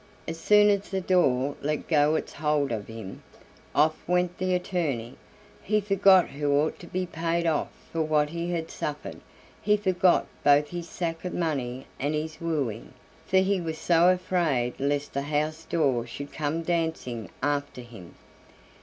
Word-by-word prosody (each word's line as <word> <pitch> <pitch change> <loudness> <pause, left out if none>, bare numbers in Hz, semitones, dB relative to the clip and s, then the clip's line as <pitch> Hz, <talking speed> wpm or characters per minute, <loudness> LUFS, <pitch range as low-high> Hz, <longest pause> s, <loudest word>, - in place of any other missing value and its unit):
As 165 0 -5
soon 210 +4 +5
as 200 0 -1
the 195 - -1
door 145 -8 +2
let 150 +1 -2
go 150 -1 +3
its - - -3
hold 150 -2 0
of 105 -3 -3
him, 110 -4 -8 0.5
off 155 +2 +4
went 180 0 +1
the 185 0 +1
attorney. 160 - -2 0.5
He 210 +1 +1
forgot 195 -2 +5
who 145 0 -2
ought 155 +2 -1
to 175 - -11
be 185 +1 -2
paid 170 0 -1
off 160 -2 +1 0.2
for 165 - 0
what 150 -1 +1
he 170 +1 -3
had 165 -2 -3
suffered, 150 0 -5 0.4
he 210 0 +3
forgot 185 -3 +3 0.2
both 145 +1 +5
his 170 -1 -6
sack 165 -2 -3
of 180 - -4
money 135 -6 -2
and 145 +3 -1
his 155 +1 -4
wooing, 140 -11 -2 0.3
for 190 - +3
he 190 0 +2
was 160 -2 -4
so 170 +1 +4
afraid 170 -9 +1
lest 145 +1 -1
the 140 - -1
house 155 +2 -2
door 135 -8 +1
should 140 +4 -8
come 155 +2 -2
dancing 160 - -2
after 145 -2 -1
him. 115 -8 -13
160 Hz, 165 wpm, -27 LUFS, 145-175 Hz, 0.5 s, soon